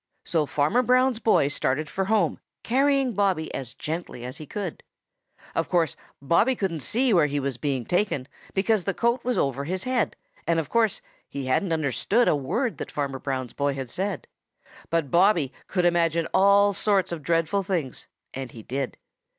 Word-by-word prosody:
So 155 -3 +1
Farmer 150 - +2
Brown's 255 -1 +3
boy 220 -11 +3
started 145 +1 -1
for 190 +5 -2
home, 215 +1 +1 0.2
carrying 270 0 +2
Bobby 190 -5 0
as 125 -4 -6
gently 155 -6 -5
as 125 - -6
he 155 - -9
could. 195 -2 -5 0.7
Of - - -1
course 170 -4 +1 0.2
Bobby 170 - +3
couldn't 190 -7 -2
see 240 - +1
where 170 -5 +5
he 145 0 -1
was 135 -2 -2
being 135 -4 -2
taken, 175 -8 0 0.3
because 200 0 +2
that 195 - -2
coat 235 +1 +1
was 250 0 0
over 140 0 0
his 185 +3 -2
head, 255 -1 0 0.3
and 170 -1 +3
of 160 - -4
course 225 -4 +2 0.3
he 140 -1 -5
hadn't 165 +8 +1
understood 160 - +1
a - - +4
word 215 - -1
that - - -5
Farmer 140 -2 -3
Brown's 130 -3 -3
boy 140 -1 0
had 130 -3 -5
said. 195 +1 -3 0.6
But 165 -4 0
Bobby 170 -6 +3
could 180 -2 0
imagine 170 -1 +2
all 200 +1 +5
sorts 200 -1 +1
of 170 -2 -4
dreadful 165 +5 +1
things, 175 -9 -3 0.3
and 130 -2 -6
he 115 - -10
did. 135 +2 -3
170 Hz, 175 wpm, -25 LUFS, 140-205 Hz, 0.7 s, where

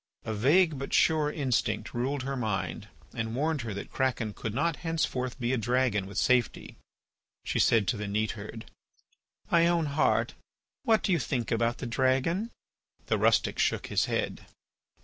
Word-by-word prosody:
A 110 - -2
vague 150 - +3
but 135 - -2
sure 155 -2 +3
instinct 130 -6 -1
ruled 130 +3 -1
her 135 +1 -3
mind 110 -6 -3 0.3
and 115 0 -3
warned 155 +2 0
her 115 -2 -5
that 100 - -7
Kraken 120 -5 -1
could 110 - -5
not 165 +3 0
henceforth 135 -7 -2
be 120 +1 0
a 130 - +1
dragon 120 -3 +1
with 100 - -8
safety. 125 -2 +1 0.7
She - - -1
said 115 -4 +4
to 120 - 0
the 105 0 -4
neatherd: 110 +1 -3 0.9
"My 170 0 +5
own 170 -2 +2
heart, 145 +1 +1 0.5
what 220 -1 +2
do - - +1
you 170 - +3
think 125 -2 -2
about 115 +1 +1
the - - -6
dragon?" 130 - +1 0.6
The - - 0
rustic - - +2
shook - - 0
his - - +3
head. - - -3
130 Hz, 165 wpm, -29 LUFS, 115-150 Hz, 0.9 s, My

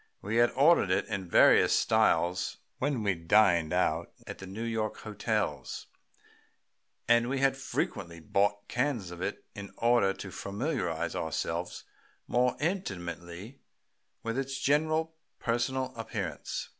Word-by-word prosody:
We 105 +4 -2
had 120 0 +5
ordered 140 - +5
it 95 - +2
in 100 -4 -4
various - - +6
styles 90 +1 +2 0.2
when 135 -4 0
we 100 -2 +2
dined 85 -2 +3
out - - 0
at - - -8
the 95 - -8
New 100 +5 -5
York 115 -2 -2
hotels, 105 -2 -3 1.2
and 120 +1 +4
we 135 - 0
had 135 0 +3
frequently 85 -9 -3
bought 100 +5 0
cans 120 -7 -1
of 90 0 -8
it - - -4
in 100 -1 -8
order 115 -4 +3
to 95 - -8
familiarize 100 - -2
ourselves - - -3 0.4
more 125 0 +2
intimately 95 - -4 0.6
with 115 +3 -2
its 135 0 -3
general 155 +4 +1 0.3
personal 130 +1 -1
appearance. 115 -1 -4
115 Hz, 130 wpm, -30 LUFS, 95-130 Hz, 1.2 s, various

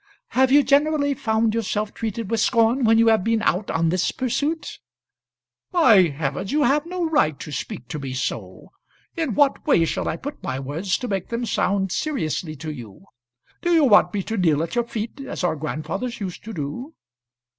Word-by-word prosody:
"Have 260 0 +2
you 290 +1 +6
generally 285 0 +2
found 220 -3 0
yourself 215 -1 -2
treated 225 -1 -4
with 230 - +1
scorn 230 +3 +3
when 225 0 +5
you 230 0 +5
have 220 -4 +3
been 225 0 +1
out 195 +1 0
on 165 0 +1
this 180 +2 +1
pursuit?" 285 +6 -2 0.9
"By 230 - +6
heavens! 145 +5 -3
you 300 0 +2
have 290 +5 +2
no 355 -1 -2
right 155 - +1
to 150 - -7
speak 125 -3 -6
to 150 - -4
me 135 -2 -5
so. 130 - -5 0.4
In 320 -9 -2
what 285 -2 +2
way 165 - +4
shall - - -2
I 165 - -2
put 285 +9 -7
my 130 0 -3
words 160 +8 -2
to 250 - -5
make 195 -4 -3
them 235 +1 -2
sound 195 -3 0
seriously 170 - -2
to 155 +2 -6
you? 120 - -11 0.6
Do 345 0 +2
you 320 - +5
want 220 -7 +5
me 205 -2 -2
to 225 +3 -4
kneel 160 -5 +2
at 170 - -5
your 240 -1 +1
feet, 230 +2 -5
as 270 - -5
our 175 -3 +1
grandfathers 155 - -4
used 190 -4 -6
to 225 - -6
do?" 175 - -6
220 Hz, 195 wpm, -23 LUFS, 165-260 Hz, 0.9 s, you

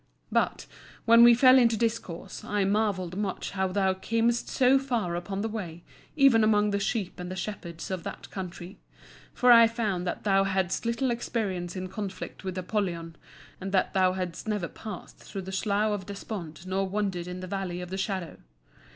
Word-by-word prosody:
But, - - 0 0.4
when 230 +1 +8
we 240 0 +9
fell 255 +2 +7
into 230 -2 +4
discourse, 195 -5 -3
I 205 -1 0
marvelled 195 -3 0
much 200 -1 -3
how 190 -1 0
thou 190 0 +1
camest 230 +5 0
so 260 +1 +4
far 235 -10 -1
upon 195 +3 -3
the 220 - -1
way, 175 -7 -6 0.3
even 270 -6 +6
among 210 -1 +3
the 200 - 0
sheep 205 -3 -2
and 180 0 -5
the 185 - -5
shepherds 175 -3 -6
of 185 -2 -2
that - - -8
country. 185 0 -7 0.5
For 250 0 +4
I 230 -1 +9
found 210 -6 -2
that - - -3
thou 195 -1 +3
hadst 190 +2 -1
little 235 +2 0
experience 195 -7 -2
in 185 0 -4
conflict 195 0 -6
with 185 -1 -4
Apollyon, 175 -4 -2 0.4
and 190 +1 -5
that 190 - +2
thou 185 -1 +3
hadst 185 +1 -5
never 210 -5 -1
passed 215 +4 -9
through 195 -2 -7
the 190 - -7
Slough 205 +2 +1
of 200 -3 -3
Despond 190 -5 -7
nor 190 +1 -1
wandered 190 -3 -2
in 180 0 -6
the - - -5
Valley 185 -2 -3
of 180 0 -7
the - - -2
Shadow. 190 -4 -3
195 Hz, 185 wpm, -28 LUFS, 185-220 Hz, 0.5 s, we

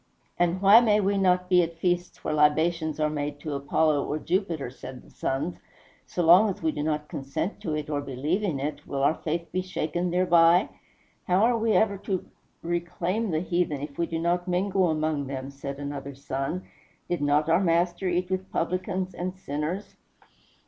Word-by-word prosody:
"And 175 +2 +1
why 200 +4 +9
may 215 -3 +3
we 200 0 +1
not 180 -1 +2
be 180 -1 +5
at 165 -1 -3
feasts 175 +1 -1
where - - -1
libations 155 +1 +2
are 155 - +2
made 145 -1 -3
to 150 -1 -4
Apollo 145 +1 +1
or 150 - -2
Jupiter?" 165 -6 -2
said 130 0 -10
the - - -19
sons; 145 +6 -3 0.5
"so 175 - -2
long 180 +6 +7
as 185 - -5
we 160 - +2
do 150 - -4
not 150 0 -1
consent 140 +9 -4
to 155 -3 -2
it 150 -1 -3
or 145 -1 -1
believe 145 +8 -2
in 175 -10 -1
it, 145 +3 -4
will 135 -1 -2
our 145 - +4
faith 165 +1 -4
be 185 - 0
shaken 180 -1 -2
thereby?" 175 0 +4 0.6
"How 185 +3 +3
are 240 +1 +4
we 225 -1 +1
ever 200 -3 +2
to 195 -2 -3 0.4
reclaim 175 +5 -2
the 160 -2 0
heathen, 170 -5 -1
if 145 +1 -7
we 170 - +1
do 165 - -3
not 175 +2 0
mingle 185 0 +1
among 155 -2 -1
them?" 135 0 -5
said 140 0 -6
another 140 -1 -6
son; 135 +6 -3 0.4
"did 175 - -2
not 145 +1 +2
our 165 +3 +4
Master 175 +1 +1
eat 180 +1 -1
with 185 0 -3
publicans 185 +2 -2
and 180 +2 -4
sinners?" 160 +4 -4
170 Hz, 190 wpm, -26 LUFS, 150-185 Hz, 0.6 s, why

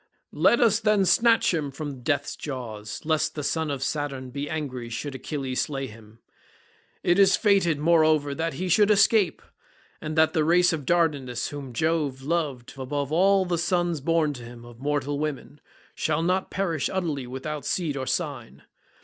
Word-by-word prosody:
Let 235 - +4
us 225 -3 +4
then 210 -3 +3
snatch 230 +1 +4
him 150 -4 -1
from 140 -2 -7
death's 145 +1 -1
jaws, 110 -7 -6
lest 155 -1 0
the 150 - -4
son 160 +2 -1
of 140 -2 -3
Saturn 135 -3 -3
be 140 +2 -4
angry 130 -7 -4
should 140 +5 -5
Achilles 130 -1 -3
slay 135 -2 -3
him. 110 -2 -13 0.9
It 175 +2 +3
is 195 -1 +6
fated, 195 -7 +3
moreover, 155 -2 +3
that 160 0 -3
he 185 +6 -3
should 205 +4 +4
escape, 205 -3 +3 0.6
and 155 +1 -5
that 160 0 +4
the 155 - +2
race 175 +2 +4
of 150 -5 -5
Dardanus, 145 -8 0
whom 140 -3 -7
Jove 145 0 -1
loved 145 -6 -2
above 140 +2 -3
all 190 +3 +4
the 175 -2 -1
sons 175 -2 0
born 160 0 +1
to 125 -3 -9
him 120 0 -11
of 120 -1 -14
mortal 145 0 -1
women, 145 -1 -5 0.3
shall 155 +1 -1
not 185 +2 0
perish 170 -7 -1
utterly 155 -9 -2
without 140 +4 -5
seed 165 -6 -1
or 130 -1 -4
sign. 65 +3 -4
150 Hz, 170 wpm, -25 LUFS, 135-170 Hz, 0.9 s, is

